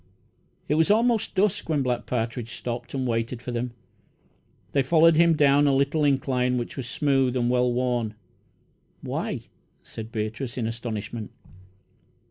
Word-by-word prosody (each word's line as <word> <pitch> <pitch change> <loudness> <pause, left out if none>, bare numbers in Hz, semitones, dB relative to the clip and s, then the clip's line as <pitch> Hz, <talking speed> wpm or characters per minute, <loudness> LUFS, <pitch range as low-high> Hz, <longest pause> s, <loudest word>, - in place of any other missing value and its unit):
It - - +1
was 160 +3 +3
almost 225 +1 +2
dusk 200 -2 +1
when 150 -4 +1
Black 125 -1 -2
Partridge 115 0 -3
stopped 120 +1 -5
and 130 -1 -1
waited 115 +1 -1
for 125 - -6
them. 120 +1 -2 1.0
They 140 - +3
followed 165 +4 +5
him 170 0 +5
down 145 -1 +4
a 140 - +3
little 140 +3 +1
incline, 130 -3 +1
which 120 - -4
was 130 -3 -5
smooth 135 -3 +1
and 120 0 +1
well 125 0 +2
worn. 120 -3 -1 0.9
"Why!" - - -3 0.4
said 110 0 -9
Beatrice, 110 +3 -4
in 120 - -1
astonishment. 115 -1 -5
125 Hz, 145 wpm, -25 LUFS, 120-145 Hz, 1.0 s, followed